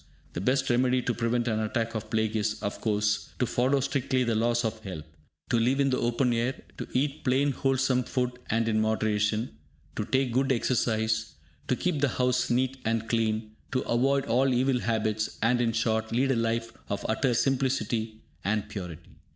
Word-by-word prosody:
The 85 Hz, -, -3 dB
best 135 Hz, +5 st, +1 dB
remedy 125 Hz, +1 st, +2 dB
to 125 Hz, -, 0 dB
prevent 120 Hz, +1 st, 0 dB
an 110 Hz, -2 st, +1 dB
attack 115 Hz, +1 st, -1 dB
of 110 Hz, -1 st, -5 dB
plague 110 Hz, 0 st, 0 dB
is, 110 Hz, 0 st, 0 dB
of 100 Hz, -, -3 dB
course, 105 Hz, -1 st, 0 dB
to 125 Hz, -, +1 dB
follow 130 Hz, +3 st, +2 dB
strictly 130 Hz, -1 st, 0 dB
the 120 Hz, -2 st, 0 dB
laws 120 Hz, +2 st, +1 dB
of 110 Hz, 0 st, -2 dB
health, 95 Hz, -8 st, -7 dB, 0.5 s
to 120 Hz, -, +3 dB
live 125 Hz, +4 st, +2 dB
in 135 Hz, -1 st, +3 dB
the 130 Hz, -, +1 dB
open 120 Hz, +1 st, +1 dB
air, 120 Hz, +3 st, -1 dB, 0.2 s
to -, -, -4 dB
eat 145 Hz, +3 st, -1 dB
plain 140 Hz, +2 st, +2 dB
wholesome 135 Hz, -1 st, +1 dB
food 125 Hz, -1 st, 0 dB, 0.2 s
and 115 Hz, +1 st, +1 dB
in 110 Hz, -1 st, +2 dB
moderation, 110 Hz, -, 0 dB, 0.4 s
to -, -, -1 dB
take 130 Hz, +3 st, +1 dB
good 135 Hz, +2 st, +2 dB
exercise, 110 Hz, -3 st, 0 dB, 0.3 s
to 130 Hz, -, +2 dB
keep 155 Hz, 0 st, -1 dB
the 145 Hz, -, +3 dB
house 125 Hz, 0 st, +1 dB
neat 130 Hz, +2 st, +1 dB
and 115 Hz, 0 st, -1 dB
clean, 110 Hz, -1 st, 0 dB, 0.2 s
to 130 Hz, -, +1 dB
avoid 135 Hz, +3 st, +1 dB
all 130 Hz, +1 st, +2 dB
evil 130 Hz, +1 st, +2 dB
habits, 110 Hz, -2 st, -1 dB
and, 120 Hz, +2 st, +3 dB
in 115 Hz, -1 st, +2 dB
short, 110 Hz, -1 st, 0 dB
lead 130 Hz, +4 st, +2 dB
a -, -, +2 dB
life 115 Hz, 0 st, -1 dB, 0.2 s
of 100 Hz, -, -3 dB
utter 120 Hz, +2 st, +1 dB
simplicity 115 Hz, -4 st, 0 dB, 0.2 s
and 105 Hz, +1 st, -1 dB
purity. 90 Hz, -6 st, -8 dB
120 Hz, 185 wpm, -28 LUFS, 110-130 Hz, 0.5 s, to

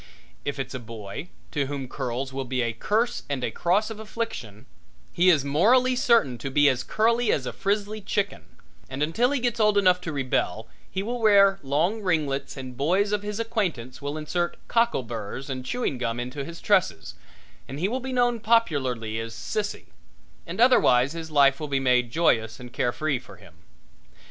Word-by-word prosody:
If 145 Hz, 0 st, -2 dB
it's 135 Hz, -, -4 dB
a 130 Hz, -, -4 dB
boy, 110 Hz, -, -8 dB, 0.2 s
to 145 Hz, -3 st, -1 dB
whom 140 Hz, -2 st, -4 dB
curls 130 Hz, 0 st, -4 dB
will 135 Hz, 0 st, -2 dB
be 125 Hz, -1 st, -1 dB
a 115 Hz, -1 st, -1 dB
curse 225 Hz, -, 0 dB
and 135 Hz, -3 st, -2 dB
a -, -, -1 dB
cross 200 Hz, +6 st, +1 dB
of 220 Hz, -, -7 dB
affliction, 215 Hz, -, -6 dB, 0.5 s
he 180 Hz, +2 st, +4 dB
is 150 Hz, -6 st, +4 dB
morally 245 Hz, -, +4 dB
certain 230 Hz, -, +3 dB
to 135 Hz, -, -4 dB
be 145 Hz, +2 st, +4 dB
as 130 Hz, -2 st, 0 dB
curly 230 Hz, -, +2 dB
as 130 Hz, -, 0 dB
a -, -, -4 dB
frizzly 205 Hz, +2 st, -1 dB
chicken, 200 Hz, 0 st, -2 dB, 0.4 s
and 135 Hz, +2 st, -2 dB
until 225 Hz, +11 st, +2 dB
he 285 Hz, -1 st, 0 dB
gets 240 Hz, -1 st, -1 dB
old 210 Hz, -1 st, +4 dB
enough 180 Hz, -2 st, +4 dB
to 165 Hz, -, -4 dB
rebel 135 Hz, -3 st, -1 dB, 0.2 s
he 190 Hz, -, -3 dB
will 240 Hz, +3 st, -3 dB
wear 200 Hz, -2 st, +5 dB
long 160 Hz, +10 st, 0 dB
ringlets 150 Hz, -8 st, -1 dB
and 130 Hz, -1 st, -7 dB
boys 185 Hz, +10 st, +1 dB
of 210 Hz, -1 st, 0 dB
his 210 Hz, +1 st, -5 dB
acquaintance 180 Hz, -, -2 dB
will 145 Hz, +2 st, -4 dB
insert 175 Hz, +3 st, -2 dB
cockle 230 Hz, -, +2 dB
burs 115 Hz, +4 st, -6 dB
and 130 Hz, -1 st, -5 dB
chewing 145 Hz, -, -2 dB
gum 115 Hz, -1 st, -2 dB
into 125 Hz, +3 st, -4 dB
his 170 Hz, +3 st, -9 dB
tresses, 190 Hz, -, +1 dB, 0.5 s
and 135 Hz, +3 st, -7 dB
he 180 Hz, -, +1 dB
will 250 Hz, +5 st, -2 dB
be 260 Hz, +1 st, -5 dB
known 245 Hz, -2 st, +2 dB
popularly 135 Hz, -, +1 dB
as 115 Hz, 0 st, -6 dB
Sissie 210 Hz, -, -4 dB, 0.6 s
and -, -, -6 dB
otherwise 140 Hz, -, +5 dB
his 165 Hz, -1 st, -6 dB
life 140 Hz, -2 st, +4 dB
with 150 Hz, -2 st, -5 dB
be 135 Hz, -1 st, +1 dB
made 125 Hz, -2 st, +2 dB
joyous 115 Hz, -7 st, +1 dB
and 125 Hz, -1 st, -10 dB
carefree 135 Hz, +2 st, 0 dB
for -, -, -14 dB
him. -, -, -17 dB
155 Hz, 190 wpm, -25 LUFS, 130-210 Hz, 0.6 s, wear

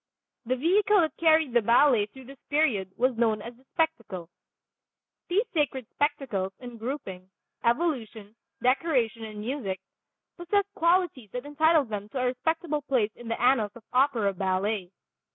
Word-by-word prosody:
The 255 Hz, -, +2 dB
vehicle 390 Hz, -, +3 dB
that 315 Hz, -, -1 dB
carried 315 Hz, -5 st, +4 dB
the 240 Hz, -, +5 dB
ballet 235 Hz, -1 st, +4 dB
through 260 Hz, +4 st, -14 dB
this 275 Hz, +2 st, -13 dB
period 250 Hz, -11 st, +1 dB
was 255 Hz, +1 st, +2 dB
known 220 Hz, -2 st, +2 dB
as 235 Hz, +3 st, -9 dB
the 255 Hz, -, -24 dB
"spectacle." 235 Hz, -, -2 dB, 1.0 s
These 400 Hz, +7 st, +2 dB
sacred 280 Hz, -6 st, 0 dB
spectacles, 265 Hz, -10 st, -1 dB
in 245 Hz, -2 st, -9 dB
grouping, 195 Hz, -7 st, -6 dB, 0.3 s
evolution, 235 Hz, -6 st, -1 dB, 0.3 s
decoration 250 Hz, -4 st, +1 dB
and 215 Hz, -1 st, -8 dB
music, 215 Hz, -6 st, -3 dB, 0.6 s
possessed 400 Hz, +3 st, 0 dB
qualities 335 Hz, -, +1 dB
that 250 Hz, +2 st, -4 dB
entitle 310 Hz, +2 st, +3 dB
them 210 Hz, -2 st, -5 dB
to 265 Hz, -, -6 dB
a 255 Hz, -, +1 dB
respectable 300 Hz, +5 st, -1 dB
place 250 Hz, -7 st, +1 dB
in 240 Hz, -, -11 dB
the 230 Hz, -, -2 dB
annals 235 Hz, -4 st, +2 dB
of 235 Hz, -, -13 dB
opera 250 Hz, -6 st, +3 dB
ballet. 190 Hz, +1 st, -1 dB
250 Hz, 150 wpm, -27 LUFS, 215-300 Hz, 1.0 s, the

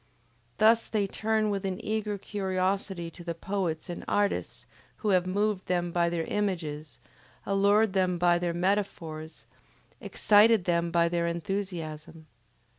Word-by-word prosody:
Thus 225 Hz, +2 st, +4 dB
they 210 Hz, -2 st, +1 dB
turn 215 Hz, +1 st, 0 dB
with 200 Hz, -1 st, -2 dB
an 190 Hz, -1 st, -3 dB
eager 210 Hz, -1 st, -1 dB
curiosity 190 Hz, -3 st, -2 dB
to 175 Hz, -, -12 dB
the 170 Hz, -1 st, -4 dB
poets 175 Hz, -3 st, -3 dB
and 175 Hz, -, -6 dB
artists 205 Hz, -1 st, -1 dB, 0.4 s
who -, -, +3 dB
have 185 Hz, -2 st, +3 dB
moved 205 Hz, +1 st, 0 dB
them 175 Hz, -1 st, 0 dB
by 170 Hz, 0 st, +2 dB
their 170 Hz, -1 st, -1 dB
images, 160 Hz, -, -3 dB, 0.5 s
allured 200 Hz, +1 st, +3 dB
them 185 Hz, -2 st, +1 dB
by 175 Hz, 0 st, +3 dB
their 175 Hz, -1 st, -1 dB
metaphors, 170 Hz, -4 st, -2 dB, 0.5 s
excited 210 Hz, -2 st, +4 dB
them 170 Hz, -1 st, +1 dB
by 170 Hz, 0 st, +3 dB
their 170 Hz, 0 st, 0 dB
enthusiasm. 170 Hz, -3 st, -4 dB
185 Hz, 135 wpm, -28 LUFS, 170-205 Hz, 0.5 s, Thus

